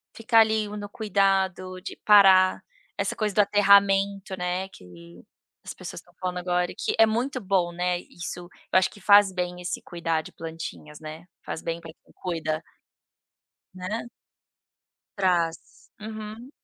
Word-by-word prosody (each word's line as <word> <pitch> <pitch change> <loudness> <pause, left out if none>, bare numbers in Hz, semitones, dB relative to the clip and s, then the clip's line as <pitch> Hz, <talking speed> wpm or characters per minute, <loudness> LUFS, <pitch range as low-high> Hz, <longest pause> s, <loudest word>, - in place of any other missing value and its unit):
ficar 225 0 +3
ali 220 -1 +3
no 205 -1 -7
cuidado, 195 -3 0
de - - -7
parar, 190 -3 +6 0.4
essa - - -1
coisa 210 -2 -1
do - - +1
aterramento, 200 -1 +3
né, 180 +1 -2
que 85 - -15 0.4
as - - -7
pessoas - - -8
estão - - -25
falando 180 -1 -3
agora 180 0 0
que - - -1
é 225 - +7
muito 245 +4 -1
bom, 185 -5 0
né, 180 0 -1
isso, 175 0 -8
eu 175 - -13 0.3
acho 185 - +1
que 205 - -15
faz 200 0 +6
bem 180 -1 -3
esse 175 - -4
cuidar 165 -2 -2
de - - -12
plantinhas, 160 -2 -8
né, 155 +2 -9 0.2
faz - - -5
bem 165 0 -3
para 165 -1 -11
quem - - -27
cuida. 160 -3 -3 1.1
Né. 195 +6 -4 1.1
Trás. 175 -4 -1
Uhum. 215 +3 -8
185 Hz, 150 wpm, -26 LUFS, 175-205 Hz, 1.1 s, é